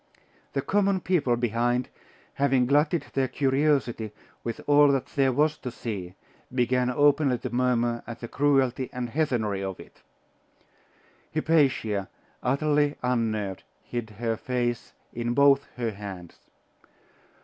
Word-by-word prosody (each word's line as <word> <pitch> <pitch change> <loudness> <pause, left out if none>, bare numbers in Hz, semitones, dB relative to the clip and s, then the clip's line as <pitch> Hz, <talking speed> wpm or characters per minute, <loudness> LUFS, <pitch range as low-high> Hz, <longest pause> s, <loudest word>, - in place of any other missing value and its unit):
The 135 - -1
common 200 -1 +2
people 150 -11 +2
behind, 120 +1 0 0.4
having 135 -2 +2
glutted 150 +5 +2
their 135 -1 +1
curiosity 130 -5 +1 0.3
with 115 -1 -4
all 145 0 +6
that 135 -2 +2
there 135 -2 +3
was 150 +4 +1
to 125 - -5
see, 100 -7 -6 0.4
began 125 0 +1
openly 145 0 +3
to 120 - -6
murmur 120 -1 +1
at 115 0 -7
the 120 - -6
cruelty 135 -1 +1
and 125 -2 -4
heathenry 115 -10 0
of 95 -1 -5
it. - - -15 1.3
Hypatia, 135 -11 +1 0.3
utterly 145 +2 +1
unnerved, 110 -6 -1 0.2
hid 120 -2 -5
her 115 +1 -3
face 120 -1 -2 0.2
in 120 0 -2
both 140 0 +5
her 120 -2 -2
hands. 100 -4 -9
125 Hz, 125 wpm, -26 LUFS, 115-140 Hz, 1.3 s, all